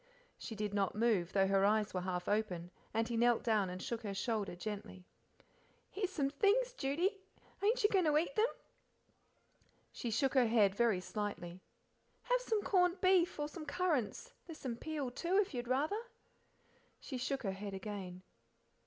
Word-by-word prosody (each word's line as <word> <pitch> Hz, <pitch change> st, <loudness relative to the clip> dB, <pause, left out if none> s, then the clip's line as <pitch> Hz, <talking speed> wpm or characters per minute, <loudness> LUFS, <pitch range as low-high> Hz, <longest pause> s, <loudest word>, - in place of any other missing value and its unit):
She 225 Hz, -, -6 dB
did 210 Hz, -1 st, -3 dB
not 200 Hz, -2 st, 0 dB
move, 210 Hz, -6 st, +2 dB
though 195 Hz, -1 st, +4 dB
her 195 Hz, 0 st, +3 dB
eyes 210 Hz, +1 st, +2 dB
were 185 Hz, -, -1 dB
half 180 Hz, -1 st, -3 dB
open, 190 Hz, -5 st, -1 dB, 0.2 s
and 225 Hz, +1 st, 0 dB
he 235 Hz, -, -2 dB
knelt 240 Hz, 0 st, +3 dB
down 215 Hz, -5 st, +2 dB
and 180 Hz, +1 st, -5 dB
shook 235 Hz, +4 st, -4 dB
her 205 Hz, -3 st, -4 dB
shoulder 210 Hz, -3 st, -1 dB
gently. 190 Hz, -1 st, -6 dB, 0.9 s
"Here's 390 Hz, -2 st, -2 dB
some 275 Hz, -6 st, 0 dB
things, 440 Hz, -, +2 dB
Judy 355 Hz, -, 0 dB, 0.4 s
ain't 440 Hz, +4 st, +3 dB
you 415 Hz, -, +5 dB
goin' 375 Hz, -4 st, +3 dB
to 300 Hz, -1 st, +4 dB
eat 340 Hz, +10 st, 0 dB
them?" 440 Hz, +1 st, +4 dB, 1.4 s
She 240 Hz, -, -4 dB
shook 250 Hz, +4 st, +1 dB
her 255 Hz, -3 st, +5 dB
head 215 Hz, -4 st, +4 dB
very 220 Hz, -3 st, +2 dB
slightly. 185 Hz, -4 st, -4 dB, 0.6 s
"Have -, -, +1 dB
some 445 Hz, -4 st, 0 dB
corned 360 Hz, -1 st, +3 dB
beef, 370 Hz, -3 st, +3 dB
or 295 Hz, -, 0 dB
some 310 Hz, +1 st, -8 dB
currants; 330 Hz, -, -1 dB
there's 325 Hz, -2 st, -8 dB
some 255 Hz, -5 st, -4 dB
peel, 290 Hz, 0 st, -4 dB
too, 345 Hz, +9 st, 0 dB
if 405 Hz, -6 st, +2 dB
you'd 240 Hz, -1 st, -3 dB
rather." 300 Hz, -, +1 dB, 1.0 s
She 260 Hz, -3 st, -6 dB
shook 265 Hz, +1 st, -2 dB
her 195 Hz, -, 0 dB
head 195 Hz, +1 st, -6 dB
again. 190 Hz, -2 st, -6 dB
235 Hz, 170 wpm, -35 LUFS, 200-335 Hz, 1.4 s, you